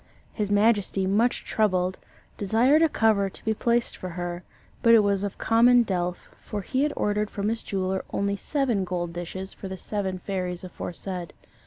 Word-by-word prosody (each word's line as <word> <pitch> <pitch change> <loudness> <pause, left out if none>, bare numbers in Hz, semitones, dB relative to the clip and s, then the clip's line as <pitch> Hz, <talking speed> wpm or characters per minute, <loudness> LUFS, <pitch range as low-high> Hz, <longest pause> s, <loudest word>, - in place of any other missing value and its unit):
His 210 -3 -2
majesty, 205 -2 +2
much 215 +6 +1
troubled, 185 -4 +1 0.4
desired 235 +9 +3
a 325 - +5
cover 215 -6 +2
to - - -13
be 220 - +2
placed 235 +2 0
for 185 - -6
her, 175 0 -4 0.4
but 230 0 +7
it 225 - +7
was 200 -1 +1
of 200 - -4
common 240 +2 +5
delf, 180 -4 -2
for 205 -2 -5
he 260 +5 -1
had 295 0 +1
ordered 210 0 0
from 205 +1 -2
his 225 0 -2
jeweller 190 -1 -2
only 200 0 -1
seven 240 -2 0
gold 175 -2 -3
dishes 180 +2 -6
for 195 - -8
the 190 0 -6
seven 190 -2 -3
fairies 180 -1 -4
aforesaid. 180 -1 -6
200 Hz, 175 wpm, -26 LUFS, 185-225 Hz, 0.4 s, but